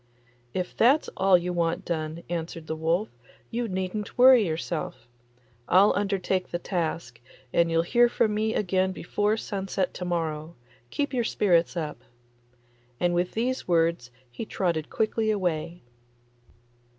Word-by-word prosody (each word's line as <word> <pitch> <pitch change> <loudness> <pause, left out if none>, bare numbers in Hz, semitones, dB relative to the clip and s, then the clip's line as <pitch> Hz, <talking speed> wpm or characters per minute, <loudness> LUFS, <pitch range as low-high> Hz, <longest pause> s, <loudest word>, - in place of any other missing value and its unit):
'If 180 +4 -3
that's 275 +7 +4
all 190 -1 +5
you 180 +1 -3
want 170 -1 -1
done,' 160 0 -3
answered 165 -1 -4
the 160 - -3
wolf, 165 +6 0 0.4
'you 235 0 -1
needn't 190 +2 -4
worry 250 -2 +8
yourself. 160 -2 -4 0.6
I'll 195 +3 +6
undertake 195 -2 -1
the - - -2
task, 170 - -3 0.3
and 170 0 +3
you'll 165 0 +2
hear 240 +7 +4
from 215 -2 +1
me 220 +1 0
again 190 -1 +1
before 205 +4 0
sunset 195 -3 -2
to - - -6
morrow. 165 -2 -3 0.3
Keep 285 - -2
your 245 -2 +1
spirits 175 -6 +2
up.' 155 -3 -4 1.0
And 175 0 +2
with 175 +1 0
these 255 +4 -1
words 165 -7 +1 0.2
he 120 - -6
trotted 170 -7 -2
quickly 220 0 0
away. 175 -4 -2
180 Hz, 140 wpm, -26 LUFS, 165-210 Hz, 1.0 s, worry